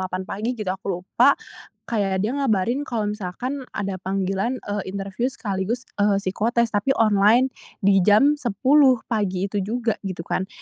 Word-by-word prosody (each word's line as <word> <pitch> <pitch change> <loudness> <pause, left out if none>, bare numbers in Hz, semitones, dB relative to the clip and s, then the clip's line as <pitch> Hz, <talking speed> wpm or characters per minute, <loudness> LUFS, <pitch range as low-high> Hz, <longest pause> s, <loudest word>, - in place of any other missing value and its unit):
8 185 0 -3
pagi 225 +5 -3
gitu, 210 -4 -3
aku 190 - -10
lupa. 180 +1 +3 0.5
Kayak 195 -3 -1
dia 225 - 0
ngabarin 235 +2 +1
kalau 235 -7 -2
misalkan 235 +8 -4 0.2
ada 195 -2 -3
panggilan, 195 +5 -1
eee, 205 -1 -3
interview 200 +6 -2
sekaligus, 225 0 -3 0.2
eee, 205 -1 +3
psikotes 230 +4 0
tapi 205 +6 +1
online 220 +4 +4 0.3
di 195 -1 +5
jam 210 +10 +5
10, 260 +4 +4
pagi 195 -5 -1
itu 200 0 -2
juga, 225 +3 -1 0.2
gitu 175 -3 -6
kan. 190 +1 -2
205 Hz, 155 wpm, -23 LUFS, 195-240 Hz, 0.5 s, di